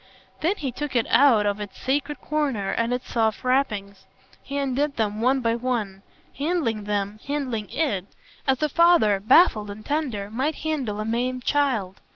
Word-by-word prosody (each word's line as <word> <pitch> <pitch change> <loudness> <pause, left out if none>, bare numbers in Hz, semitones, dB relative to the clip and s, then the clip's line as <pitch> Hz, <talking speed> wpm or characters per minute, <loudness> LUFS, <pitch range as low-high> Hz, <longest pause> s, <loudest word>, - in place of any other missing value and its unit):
Then 350 +6 +1
he 275 -9 -4
took 290 +2 -5
it 235 - +3
out 245 -7 +5
of 205 0 0
its 205 -1 -7
sacred 285 +3 -1
corner 275 -10 -1
and 230 +1 0
its 250 0 -3
soft 220 -2 0
wrappings; 210 -7 -1 0.3
he 280 - -5
undid 280 +1 0
them 215 -1 -1
one 260 +3 +2
by 230 -1 +1
one, 230 -5 -2 0.4
handling 280 -10 -1
them, 205 0 -2
handling 260 -7 -2
IT, 210 - -1 0.4
as 265 +2 +2
a - - +4
father, 335 - +4
baffled 215 - +4
and 210 +1 -9
tender, 255 -10 -2
might 270 +7 -1
handle 265 -10 -2
a 215 - -2
maimed 245 +3 -1
child. 240 -10 0
245 Hz, 170 wpm, -24 LUFS, 210-285 Hz, 0.4 s, out